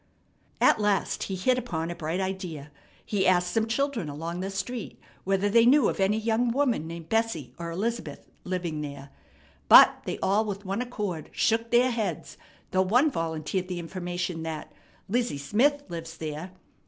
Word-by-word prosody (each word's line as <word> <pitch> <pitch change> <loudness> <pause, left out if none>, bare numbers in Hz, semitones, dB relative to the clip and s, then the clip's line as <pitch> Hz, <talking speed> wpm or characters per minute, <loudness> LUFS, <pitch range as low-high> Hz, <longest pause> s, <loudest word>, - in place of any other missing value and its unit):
At - - +4
last 205 -2 0
he 190 - -4
hit 250 +7 +2
upon 165 -7 -3
a - - -5
bright 160 +3 -3
idea. 180 -7 -4 0.3
He 195 -2 +1
asked 180 -1 +3
some 225 0 +1
children 235 - -1
along 165 +4 -5
the 190 +1 -3
street 215 +4 -5 0.3
whether 195 +1 +1
they 230 +3 +5
knew 275 -2 +5
of - - -4
any 195 +2 +2
young 225 +2 +1
woman 245 - +1
named 165 -1 -8
Bessie 225 - -1
or 170 0 -4
Elizabeth 195 -3 -4 0.2
living 175 -4 -3
there, 140 -1 -7 0.6
but - - +9
they - - -3
all 205 +3 +2
with 200 -1 -5
one 195 +5 -2
accord 205 -10 -4
shook 225 +1 +1
their 245 +2 +4
heads, 225 -3 -3 0.4
though 185 -1 +3
one 245 +11 +3
volunteered 165 - -2
the 180 -1 -4
information 175 0 -4
that 160 -1 -5 0.4
"Lizzie 235 -5 0
Smith 260 - +2
lives 165 -2 -7
there." 155 +3 -5
190 Hz, 165 wpm, -27 LUFS, 165-225 Hz, 0.6 s, but